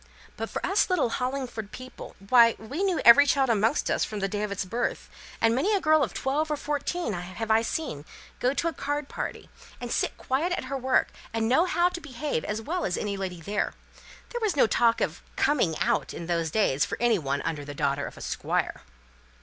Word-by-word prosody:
But - - -4
for - - -3
us 400 +1 +2
little 355 -10 +2
Hollingford 250 -5 -3
people 255 0 -10
why, 235 -2 +7
we 265 - -5
knew 380 -4 +1
every 285 +5 +9
child 270 -4 +3
amongst 225 +6 +1
us - - +1
from 215 - -4
the 195 - 0
day 205 +1 -3
of 210 -1 -2
its 200 -1 -2
birth; 235 +6 -3 0.3
and 225 0 +3
many 370 - +2
a - - +2
girl 310 -3 +4
of 240 -9 0
twelve 290 - -1
or 300 - 0
fourteen 295 -1 -2
have 185 +5 -4
I 220 +1 +5
seen 230 - -3 0.4
go 250 - +2
out 275 - -3
to 335 - +1
a 330 - -1
card 290 -1 -3
party, - - -5 0.3
and 245 -1 -5
sit - - 0
quiet 310 +8 0
at - - -2
her 265 +2 -4
work, 260 -1 +2 0.3
and 225 0 +1
know 265 +9 +4
how 350 -1 +2
to 350 -1 -7
behave 280 - -3
as 215 +1 -3
well 350 +8 -2
as 180 - -1
any 205 -1 -2
lady 185 -3 -5
there. 205 +5 -2 0.5
There 480 - -4
was 430 -6 +1
no 280 - +5
talk 230 +1 +2
of - - -1
'coming 195 - +2
out' - - 0
in 170 - -6
those 165 -1 0
days 150 -7 +2
for - - -3
any 235 -4 +3
one 140 -2 -2
under 155 -3 -3
the 145 0 -8
daughter 140 -1 0
of - - -11
a - - -10
Squire." - - -2
240 Hz, 220 wpm, -27 LUFS, 200-295 Hz, 0.5 s, every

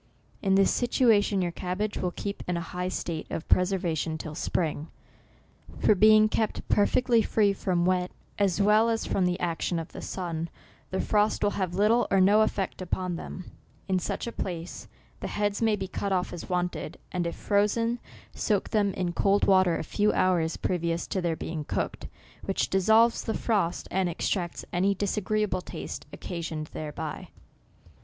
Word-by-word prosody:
In 195 -1 +2
this 195 0 +4
situation 215 -6 +3
your 175 - -1
cabbage 185 +5 -3
will 180 - -1
keep 200 +3 -5
in 180 -1 0
a 165 -1 -5
high 180 0 -2
state 170 -3 -4
of 160 - -5
preserva 180 -2 +2
tion 160 +1 -2
till 155 -1 -7
spring; 155 -1 -2 0.9
for - - +4
being 215 +2 +6
kept 220 0 -2
perfectly 230 +3 +3
free 210 -2 +2
from 180 -3 0
wet, 180 0 +1 0.3
as 195 -2 +2
well 210 +3 +4
as 225 -1 0
from 185 -2 +1
the 180 +1 -1
action 170 0 -1
of 165 -1 -5
the - - -8
sun, 170 -3 -4 0.4
the 190 - -2
frost 210 0 +1
will 205 - +3
have 185 -4 -2
little 215 +5 +3
or 195 - +3
no 205 +3 +5
effect 195 -3 -1
upon 185 0 -2
them. 180 +1 -8 0.4
In 185 -1 +1
such - - -3
a 235 - -4
place, 175 -5 -5 0.3
the - - -4
heads 205 0 -1
may 220 -2 +3
be 190 -2 -4
cut 200 +1 -3
off 180 -2 0
as 175 - -7
wanted, 180 -1 -2
and 175 -2 -1
if 170 - -4
frozen, 230 +4 +1 0.3
soak 205 -3 0
them 205 -3 +1
in 180 -2 -1
cold 200 +3 +3
water 185 -3 +4
a - - -3
few 210 +6 +1
hours 170 -3 +2
previous 170 -1 -1
to 190 - -2
their 170 -2 0
being 160 -1 -4
cooked, - - -3 0.4
which 195 - -1
dissolves 220 +5 +4
the 225 - -2
frost, 200 -7 0
and 185 -1 +1
extracts 175 +1 -2
any 195 +3 +2
disagreeable 205 -1 0
taste - - -7
occasioned 160 -3 -5
thereby." 150 -1 -5
185 Hz, 175 wpm, -27 LUFS, 175-210 Hz, 0.9 s, being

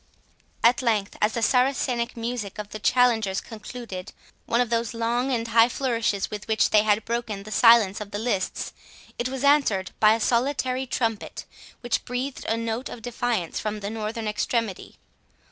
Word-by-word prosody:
At 240 +3 +5
length, 215 -5 0
as 210 +1 +2
the 235 - -2
Saracenic 250 -1 +1
music 230 -4 -4
of 210 -1 -6
the 215 - -7
challengers 220 -5 +2
concluded 215 -4 -8 0.3
one 235 - +2
of 245 -2 +1
those 230 -1 0
long 240 +3 0
and 230 -2 -1
high 230 +1 +5
flourishes 230 -6 -1
with 210 -1 -6
which 220 -1 +2
they 210 - +6
had 210 0 +1
broken 230 -4 -3
the 215 - -10
silence 225 -3 +5
of 205 - -6
the 205 - -4
lists, 210 -4 -2 0.5
it 240 +1 -1
was 265 0 -4
answered 280 -10 +3
by 215 0 +6
a - - -3
solitary 255 +2 0
trumpet, 225 -4 -2 0.4
which 240 -1 -1
breathed 255 +2 -4
a 225 - 0
note 230 +3 -3
of 230 - -9
defiance 235 -7 -2
from 215 0 -3
the 200 +1 -4
northern 220 0 -4
extremity. 210 -1 -2
230 Hz, 170 wpm, -25 LUFS, 210-245 Hz, 0.5 s, they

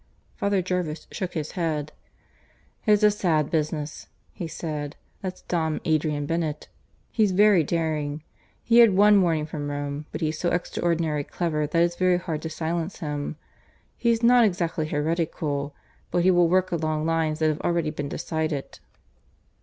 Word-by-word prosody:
Father 200 -2 0
Jervis 175 -4 -2
shook 185 -2 -4
his 155 -2 -3
head. 155 -4 -2 1.0
"It's 210 0 +4
a 210 - +7
sad 160 -7 +1
business," 150 -2 -2 0.3
he 175 -4 -5
said. 150 -2 -5 0.3
"That's 185 -1 -6
Dom 160 -3 -1
Adrian 155 -2 +1
Bennett. 160 -1 -2 0.4
He's 215 -3 +3
very 200 -3 +5
daring. 155 -2 -2 0.4
He's 235 0 +5
had 220 -5 +6
one 205 0 +6
warning 160 -4 +1
from 150 -2 -5
Rome; 145 +1 -4
but - - -5
he's 155 -1 -1
so 175 - +1
extraordinarily 165 -4 0
clever 155 -4 -1
that 165 +3 +2
it's 175 0 0
very 185 -1 +3
hard 165 -4 -4
to 160 - -4
silence 165 +3 -3
him. 150 -2 -4 0.6
He's 235 -1 +1
not 245 0 +6
exactly 170 -6 0
heretical; 150 -2 -2 0.3
but 175 - +1
he 185 - +5
will 175 -2 +4
work 185 +1 +2
along 155 -2 -1
lines 160 -1 +1
that 155 0 +2
have 155 - -2
already 170 -3 0
been 145 -2 -4
decided." 155 -3 -3
160 Hz, 155 wpm, -25 LUFS, 150-180 Hz, 1.0 s, a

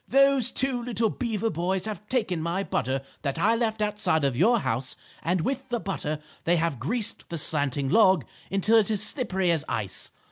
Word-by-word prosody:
"Those 275 -2 +4
two 260 -2 -1
little 230 -3 0
beaver 225 -3 -1
boys 180 +4 -1
have 215 -1 -6
taken 210 -10 0
my 170 +4 -1
butter 135 -6 -1 0.2
that 140 -1 -2
I 210 +7 +3
left 220 -2 0
outside 210 -7 0
of 135 -3 +1
your 225 - +4
house 125 +3 -2 0.3
and 175 +2 0
with 265 +7 -2
the 240 -1 -1
butter 180 -7 -3 0.3
they 175 - +3
have 165 -6 0
greased 225 - -1
the 170 - -4
slanting 145 -3 0
log 185 - +5 0.2
until 210 +4 +4
it 210 - 0
is 210 -1 +2
slippery 190 - 0
as 160 -3 0
ice. 100 -4 -3
195 Hz, 185 wpm, -26 LUFS, 160-230 Hz, 0.3 s, log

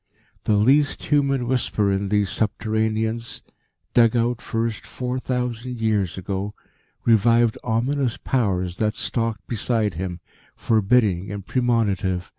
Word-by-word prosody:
The 105 - +3
least 140 +7 +3
human 140 -3 +1
whisper 110 -5 +1
in 95 0 -1
these 105 -2 +1
subterraneans, 110 +1 -1 0.5
dug 115 -1 +5
out 120 0 +1
first 115 -1 -2
four 125 0 -4
thousand 125 -1 -3
years 105 -6 0
ago, 95 +3 -4 0.5
revived 115 0 +4
ominous 125 +2 0
Powers 95 -8 -1
that 105 -1 0
stalked 115 -4 -2
beside 110 -3 -1
him, 90 +1 -4 0.4
forbidding 105 -4 +2
and 100 -1 -6
premonitive. 100 -8 0
110 Hz, 115 wpm, -23 LUFS, 100-120 Hz, 0.5 s, dug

